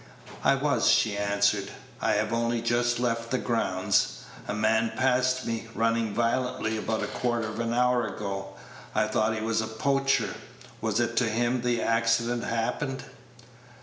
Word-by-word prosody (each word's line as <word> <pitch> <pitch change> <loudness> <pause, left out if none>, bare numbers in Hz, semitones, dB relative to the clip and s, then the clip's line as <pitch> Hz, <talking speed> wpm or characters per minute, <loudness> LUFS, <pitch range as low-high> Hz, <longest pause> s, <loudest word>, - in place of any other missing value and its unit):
"I 135 - +5
was," 135 -3 +2
she 110 -3 +3
answered; 100 0 +1 0.3
"I - - +2
have 105 +1 0
only 115 0 0
just 120 +1 +1
left 115 -1 -1
the 130 - +1
grounds. 95 - 0 0.3
A - - -2
man 110 +1 +2
passed 130 0 +2
me, 115 0 -3
running 115 -1 +1
violently, 120 0 0
about 110 0 -2
a - - 0
quarter 120 -2 -1
of 110 +1 -6
an 115 0 -1
hour 125 -1 +2
ago. 95 -1 -5 0.4
I 110 - +3
thought 110 +1 +1
he 110 - -3
was 110 0 0
a 110 - -3
poacher. 135 +5 +1 0.5
Was 110 0 0
it 120 0 0
to 120 -2 +3
him 120 +2 0
the 120 -1 0
accident 115 +1 +1
happened?" 130 +3 -2
115 Hz, 160 wpm, -27 LUFS, 110-120 Hz, 0.5 s, I